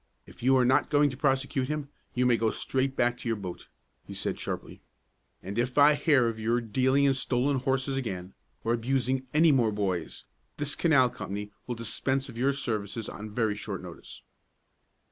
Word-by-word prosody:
If - - -15
you 130 +2 +4
are 125 - +4
not 130 +2 +3
going 145 -1 +4
to - - -7
prosecute 135 -1 0
him, 150 -1 -3 0.3
you 125 0 +2
may 125 -1 +5
go 115 -1 +1
straight 135 +3 -1
back 120 -1 +1
to - - -6
your 115 - +1
boat," 95 -4 -7 0.4
he - - -9
said - - -3
sharply. - - -5 0.6
"And 100 +5 -4
if 125 +2 -1
I 145 +1 +7
hear 145 -4 +3
of 115 -1 -3
your 115 +2 +1
dealing 130 +4 +2
in 140 -1 +4
stolen 135 +1 0
horses 135 +1 0
again, 95 -7 -4 0.3
or 115 - +1
abusing 130 +2 0
any 160 +1 +5
more 120 -6 +3
boys, 95 -5 -3 0.3
this 145 0 -1
canal 135 -7 +3
company 105 0 -6 0.2
will 120 - -2
dispense 130 +4 -1
with 125 -4 -9
your 135 +3 +2
services 110 -5 -3
on 105 +1 -7
very 110 0 0
short 105 - -6
notice." - - -10
125 Hz, 185 wpm, -28 LUFS, 115-135 Hz, 0.6 s, I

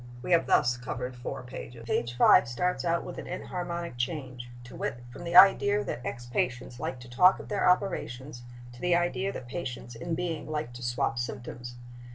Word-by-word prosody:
We - - -4
have 170 -1 +4
thus 125 0 +3
covered 125 +1 -5
four 125 +1 -6
pages. 125 -2 -9
Page 120 +1 -1
5 115 - +7
starts 180 +10 -1
out 170 -1 +1
with - - -7
an - - -7
enharmonic 175 -4 -4
change: 125 -2 -4
to 120 - -11
wit, 120 0 -4
from 175 - -9
the 170 0 -3
idea 205 +2 +7
that 125 - -5
ex 120 0 -5
patients 125 0 -2
like 130 - -4
to 120 - -11
talk 180 +10 +5
of - - -10
their 205 -3 +2
operations 145 -9 -1 0.3
to 120 - -13
the 180 -1 +3
idea 175 +3 0
that 125 - -8
patients 120 -5 -5
in 165 +9 -3
being 165 -3 -3
like 150 -5 -3
to 120 - -9
swap 120 -1 -1
symptoms. 120 0 -6
125 Hz, 195 wpm, -29 LUFS, 120-175 Hz, 0.3 s, 5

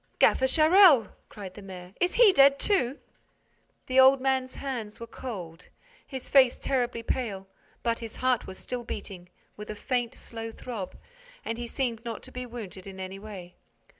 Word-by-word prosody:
"Gaffer 260 - +4
Charel!" 315 - +6 0.2
cried 195 -3 -9
the 205 - -11
mayor. 185 -1 -10
"Is 360 0 +1
he 455 -5 +7
dead, 275 -2 +6
too?" 280 - +1 0.9
The 260 +1 +2
old 265 +1 +7
man's 260 -1 0
hands 240 -6 -5
were 230 - -6
cold, 185 -10 -8 0.4
his 265 -3 -7
face 260 -3 +5
terribly 245 -3 -1
pale, 205 -7 -3 0.4
but 230 -1 0
his 225 -2 -8
heart 255 -2 +1
was 190 - -8
still 250 -1 -5
beating, 185 -5 -7 0.3
with 210 0 -9
a 215 - -4
faint, 245 +2 -2
slow 225 -1 -7
throb, 220 -5 -7 0.5
and 230 +1 -3
he 240 - -4
seemed 235 -3 -3
not 230 -2 -6
to - - -9
be 250 0 -6
wounded 205 -6 -8
in 190 -1 -9
any 190 +1 -6
way. 195 -4 -10
235 Hz, 170 wpm, -28 LUFS, 205-260 Hz, 0.9 s, he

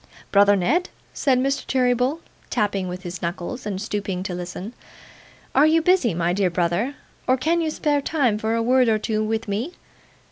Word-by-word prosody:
'Brother 205 0 +6
Ned,' 270 - +1 0.2
said 265 -3 +2
Mr. 275 +2 0
Cheeryble, 255 +4 +1 0.3
tapping 205 -5 0
with 180 +1 -6
his 175 -1 -6
knuckles, 180 +8 -4
and 195 -2 -3
stooping 200 -3 -3
to 185 - -4
listen, 180 +5 -6 0.8
'are 290 +3 +5
you 320 +1 +4
busy, 325 - +3
my 170 +1 +1
dear 190 -1 +2
brother, 175 +10 0 0.3
or 255 - +4
can 330 +6 +1
you 320 - 0
spare 295 -2 0
time 265 -8 +1
for 220 +1 0
a 230 - 0
word 250 0 +4
or 220 - +3
two 215 0 -1
with 220 +1 -2
me? 220 - -2
220 Hz, 180 wpm, -23 LUFS, 190-265 Hz, 0.8 s, Brother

